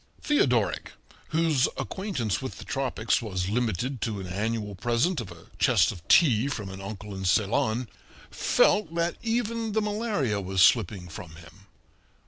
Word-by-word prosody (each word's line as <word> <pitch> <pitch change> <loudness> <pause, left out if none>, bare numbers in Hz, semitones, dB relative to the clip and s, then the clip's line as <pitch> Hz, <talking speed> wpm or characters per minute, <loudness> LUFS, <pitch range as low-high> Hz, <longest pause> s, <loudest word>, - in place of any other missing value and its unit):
Theodoric, 125 - +1 0.3
whose 155 -4 +2
acquaintance 175 - -2
with 130 - -6
the - - -10
tropics 125 -6 0
was 95 -4 -3
limited 120 +2 -1
to 110 -3 -2
an 95 - -6
annual 105 +3 -2
present 120 - 0
of 110 - -8
a - - -13
chest - - +4
of 85 - -10
tea 130 -7 +5
from 110 -8 -4
an 95 0 -8
uncle 100 +1 -7
in 95 0 -6
Ceylon, 110 +5 +1 0.4
felt 200 -6 +2
that 170 0 0
even 230 -1 -1
the 220 - +2
malaria 205 - -1
was 95 -1 +2
slipping 100 -5 +3
from 80 0 -9
him. 85 +4 -16
115 Hz, 150 wpm, -27 LUFS, 100-160 Hz, 0.4 s, tea